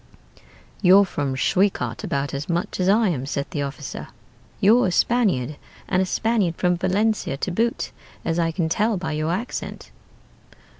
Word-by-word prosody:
"'You're 195 +1 +7
from 145 -7 -2
Schwekat 130 - 0
about 140 0 -2
as 140 +4 -4
much 170 +2 -2
as 185 +1 +2
I 215 +1 +4
am,' 135 -6 -2
said 140 0 -2
the 145 - -2
officer: 140 0 -5 0.5
'you're 225 +3 +5
a - - 0
Spaniard, 175 - +1 0.3
and 185 0 +2
a 190 - 0
Spaniard 215 -6 +1
from 180 +1 +1
Valencia 190 -3 0
to 180 - -2
boot, 230 +6 -1 0.3
as 165 +1 0
I 165 -1 +2
can 165 0 -1
tell 215 +6 +1
by 180 - -3
your 155 +1 -1
accent.' 220 +8 -5
180 Hz, 160 wpm, -23 LUFS, 145-200 Hz, 0.5 s, You're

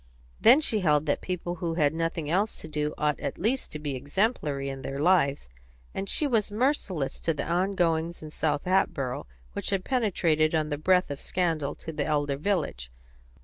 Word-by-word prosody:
Then 255 +7 +7
she 225 -8 +2
held 150 -5 +3
that 145 - 0
people 180 -1 -3
who 165 -1 -2
had 150 -3 +2
nothing 165 -1 -2
else 195 +7 +1
to - - -8
do 150 -1 -2
ought 150 -1 0
at - - -4
least 240 +7 -1
to - - -3
be 145 -2 -3
exemplary 145 - -1
in 135 -1 -5
their 135 0 -5
lives, 145 - +2 0.5
and 195 0 -4
she 305 - +3
was 225 -7 +1
merciless 205 - 0
to 165 - 0
the 180 +6 0
goings 165 -1 0
on - - -6
in 155 - -9
South 150 -2 0
Hatboro', 140 - 0 0.3
which - - -3
had 195 -2 -1
penetrated 170 - +2
on 155 -1 0
the 145 -1 -2
breath 180 +1 +3
of 140 - -5
scandal 160 -6 -1
to 160 - -8
the - - -2
elder 145 -2 0
village. 145 - -2
160 Hz, 190 wpm, -27 LUFS, 150-190 Hz, 0.5 s, Then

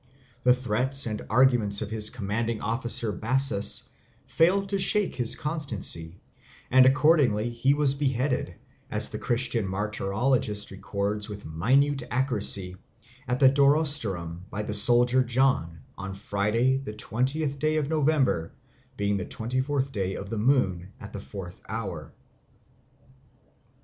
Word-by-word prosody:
The 125 0 +5
threats 130 +3 0
and 110 -2 -3
arguments 115 -4 +3
of 105 - -8
his 110 -1 0
commanding 115 0 -3
officer 115 0 -1
Bassus 115 +1 +1 0.4
failed 195 +4 +2
to 195 -1 -1
shake 210 +1 +2
his 120 -3 +1
constancy, 110 - -2 0.5
and 130 +1 +7
accordingly 130 -6 +3
he 130 +4 +1
was 145 -2 +3
beheaded, 130 -8 -1 0.3
as - - +2
the - - -5
Christian 120 -3 0
martyrologist 105 +2 -1
records 100 +2 -4
with 100 -1 -8
minute 135 - +1
accuracy, 105 -7 0 0.5
at 125 +1 -1
Durostorum 140 - +1
by 105 - -4
the 105 - -4
soldier 120 +4 +4
John 120 - 0 0.2
on 95 +1 -6
Friday 105 +7 0
the 135 -6 -7
twentieth 135 +7 -2
day 155 +2 +1
of 150 -2 -1
November, 145 - +1 0.4
being 100 0 0
the 90 - -4
twenty 125 +3 -3
fourth 135 0 -2
day 95 -5 -3
of 100 +1 -7
the 115 - -2
moon, 100 -7 0
at 100 -3 -10
the 100 - -6
fourth 95 -4 -9
hour. 95 -8 -5
115 Hz, 130 wpm, -26 LUFS, 100-135 Hz, 0.5 s, and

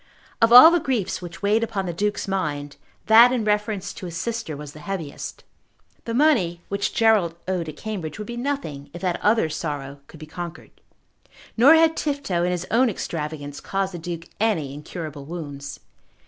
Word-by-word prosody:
Of 230 0 +5
all 250 +7 +11
the 345 - +3
griefs 255 - -2
which 175 +2 -9
weighed 215 +3 +3
upon 205 -4 -2
the 175 - -3
Duke's 205 +4 -2
mind, 145 -7 -3 0.3
that 230 +2 +8
in 240 -4 -1
reference 210 -1 -1
to 185 - -8
his 170 -1 -6
sister 225 -10 -3
was 145 0 -9
the 155 - -12
heaviest. 160 -3 -6 0.6
The 230 - -3
money 235 - +3
which 200 0 -2
Gerald 215 -7 +3
owed 180 -4 -2
at 150 - -9
Cambridge 190 -8 -5
would 210 - -6
be 240 - -6
nothing 240 - -4
if 175 - -8
that 180 -2 -1
other 215 -4 +3
sorrow 145 -3 -5
could 160 - -14
be 155 - -8
conquered. 170 +1 -8 0.8
Nor 270 +8 +7
had 320 0 +4
Tifto 280 - -1
and 180 +1 +1
his 180 0 -2
own 245 +2 +4
extravagance 150 -6 -5
caused 195 -1 -2
the 175 - -6
Duke 165 0 -6
any 175 -11 0
incurable 150 -1 -7
wounds. 145 -4 -7
185 Hz, 180 wpm, -23 LUFS, 155-225 Hz, 0.8 s, all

